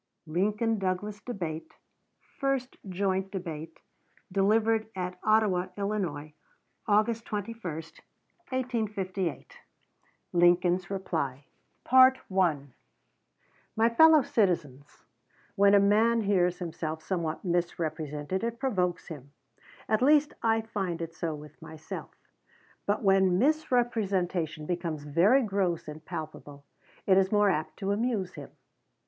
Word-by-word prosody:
LINCOLN 210 +7 0
DOUGLAS 195 +3 -3
DEBATE 170 -9 -6 0.6
FIRST 270 -2 -1
JOINT 190 0 -1
DEBATE, 165 -4 -7 0.5
DELIVERED 220 +3 +2
AT 180 -1 -4
OTTAWA, 210 -4 +2
ILL., 185 -8 -3 0.6
AUGUST 215 +2 +2
21, 225 +2 -5 0.9
1858 210 - -3 0.7
Lincoln's 175 +1 +3
Reply 155 -8 -3 0.4
MY 190 - +4 1.3
FELLOW 320 0 +7
CITIZENS: 150 - -1 0.5
When 200 0 +5
a - - +7
man 220 +4 +3
hears 180 -4 +2
himself 160 -3 -5
somewhat 170 -2 -3
misrepresented, 165 -1 -2
it 235 0 -2
provokes 185 -11 -1
him, 140 -3 -10 0.5
at 215 +1 +1
least 295 +2 +4
I 225 0 +2
find 190 -6 -3
it 165 0 -7
so 165 -1 -3
with 150 0 -13
myself; 160 -1 -8 0.8
but 205 +2 0
when 190 -2 +4
misrepresentation 200 - 0
becomes 165 -3 -3
very 180 - +4
gross 190 -6 -1
and 155 +1 -8
palpable 155 -4 -8 0.4
it 190 -1 +5
is 190 0 +1
more 205 -1 +4
apt 155 -3 -3
to 195 -1 -2
amuse 205 -4 -1
him. - - -9
190 Hz, 105 wpm, -28 LUFS, 165-215 Hz, 1.3 s, FELLOW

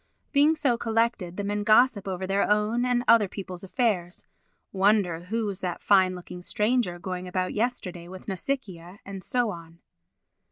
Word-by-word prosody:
Being 295 +2 +4
so 250 -6 +1
collected 225 -6 0
the 205 - -2
men 205 +1 -2
gossip 215 -1 +4
over 190 0 -3
their 195 +1 +1
own 210 +4 +2
and 245 -1 +1
other 225 -3 +6
people's 185 -2 -7
affairs—wonder 195 -3 -1
who 225 +4 -1
was 200 -2 -3
that 175 -2 -4
fine 190 -2 +4
looking 180 0 -9
stranger 210 -1 0
going 185 0 -5
about 185 0 -2
yesterday 205 -7 -3
with 185 +1 -11
Nausicaa, 190 -4 -4
and 195 -1 -8
so 245 0 0
on. 165 -2 -11
200 Hz, 155 wpm, -26 LUFS, 180-230 Hz, -, other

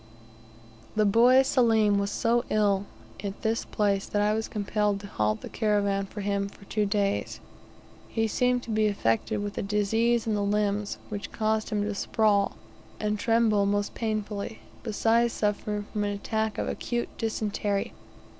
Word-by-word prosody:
The 215 0 +3
boy 245 +6 +6
Selim 220 -6 +3
was 200 0 -1
so 235 +3 +1
ill 200 -2 +2 0.4
at 200 0 -5
this 225 0 0
place 200 -2 0
that 205 - -1
I 210 +1 +3
was 220 +1 -1
compelled 210 -1 0
to - - -9
halt 105 - -1
the - - -7
caravan 200 -2 0
for 210 - -7
him 200 0 -1
for 200 - -16
two 210 +1 0
days. 200 0 -1 0.7
He 225 -1 0
seemed 250 +2 +1
to 230 - -6
be 215 0 +3
affected 195 - 0
with 205 0 -4
a - - 0
disease 220 +3 +1
in 220 - 0
the 205 - 0
limbs, 205 0 0
which 205 -1 -5
caused 220 0 0
him 210 -1 0
to 210 0 -2
sprawl, 200 0 +1 0.4
and 210 -1 -1
tremble 225 -3 +3
most 205 0 0
painfully, 215 -1 -3 0.2
besides 230 +1 +2
suffering 210 0 -1
from 210 - 0
an 205 - -1
attack 220 +1 -2
of - - -1
acute 240 -1 -2
dysentery. 210 -2 -1
210 Hz, 165 wpm, -27 LUFS, 200-220 Hz, 0.7 s, boy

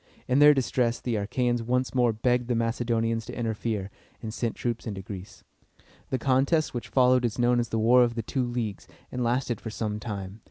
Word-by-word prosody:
In 130 +2 +3
their 150 0 +8
distress, 120 -1 0
the 120 - -3
Achæans 120 +3 0
once 125 +2 0
more 125 -2 +3
begged 120 +2 0
the 125 - 0
Macedonians 115 -1 0
to - - -7
interfere, 110 -3 -2 0.3
and 110 -2 -6
send 115 -1 -2
troops 120 -1 -3
into 100 -3 -5
Greece. 95 0 -9 0.7
The 130 - 0
contest 135 +5 +2
which 120 - -4
followed 125 -1 +4
is 115 -1 -1
known 120 0 +3
as 120 - -1
the 115 - -1
War 120 +3 +5
of 120 -1 0
the 115 - -2
Two 130 +4 -1
Leagues, 115 -5 -4 0.2
and 125 - -2
lasted 120 -1 0
for 110 - -5
some 105 -1 -3
time. 100 -2 -6
120 Hz, 200 wpm, -27 LUFS, 110-125 Hz, 0.7 s, their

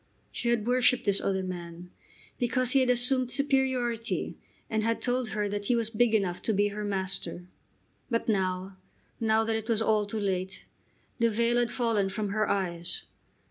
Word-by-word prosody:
She 240 - -2
had 235 -3 +1
worshipped 250 0 +3
this 200 -1 +1
other 190 -1 0
man 175 -1 -7 0.5
because 250 0 +1
he 275 - +5
had 255 -1 +2
assumed 250 +1 +2
superiority 255 -4 0 0.3
and 220 -1 0
had 230 +1 0
told 250 -2 -1
her 210 -1 -1
that 205 0 -3
he 245 - +3
was 230 -1 -1
big 225 0 +3
enough 185 -4 0
to 220 - 0
be 205 +1 +3
her 210 +1 -5
master. 190 -3 -3 0.6
But 230 -2 -1
now, 190 -2 -1 0.4
now 220 -1 +3
that 225 0 0
it 220 +1 -4
was 225 -2 +2
all 215 -2 +2
too 215 +1 -3
late, 190 -2 -2 0.5
the 230 0 +4
veil 235 +2 +2
had 240 -1 +1
fallen 225 -5 +1
from 210 +1 -3
her 215 +2 0
eyes. 175 -3 -2
220 Hz, 180 wpm, -28 LUFS, 195-240 Hz, 0.6 s, he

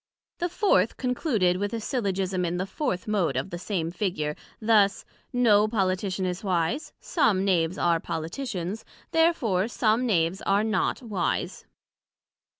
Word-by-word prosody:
The 350 - 0
Fourth 385 +3 +2
concluded 240 - +1
with 205 +2 -2
a - - -2
Syllogism 195 -6 -1
in 175 0 -1
the 185 - -1
fourth 195 -1 -3
Mode 180 -11 +1
of 135 +8 -3
the 175 - -5
same 170 -4 -2
Figure, 170 -5 -2 0.2
thus; 215 -3 +3 0.3
No 215 -4 +4
Politician 190 -2 -1
is 180 +2 -3
wise: 180 - -1
some 200 - +1
Knaves 175 -2 +1
are 170 -1 +2
Politicians, 180 - -4 0.3
Therefore 245 - +2
some 235 +1 +1
Knaves 175 -3 +1
are 200 +2 +2
not 220 +3 0
wise. 205 -7 -2
195 Hz, 140 wpm, -26 LUFS, 180-225 Hz, 0.3 s, No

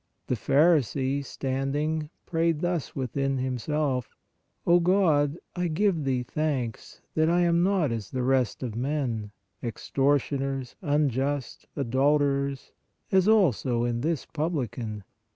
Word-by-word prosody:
The 125 - 0
pharisee, 140 0 +2
standing, 145 +4 -2 0.2
prayed 165 -2 0
thus 175 -4 -2
within 135 +1 -1
himself: 130 +1 -1 0.5
O 175 +1 +5
God, 170 -5 +3 0.2
I 180 -1 0
give 170 -2 +1
Thee 130 -2 0
thanks 130 -4 -3
that 160 +1 +2
I 175 +1 +3
am 170 -1 +3
not 180 -7 +2
as 110 -4 -4
the 130 -1 -2
rest 130 -1 +1
of 120 -4 -3
men, 125 -5 -2 0.3
ex 115 -3 -6
tortioners, 135 -1 +1
unjust, 145 -3 -1
adulterers, 140 +1 +1 0.4
as 190 0 +4
also 135 - +3
is 120 -1 -1
this 160 +1 -1
publi 155 -6 -2
can. 110 -4 -6
140 Hz, 125 wpm, -27 LUFS, 130-160 Hz, 0.5 s, O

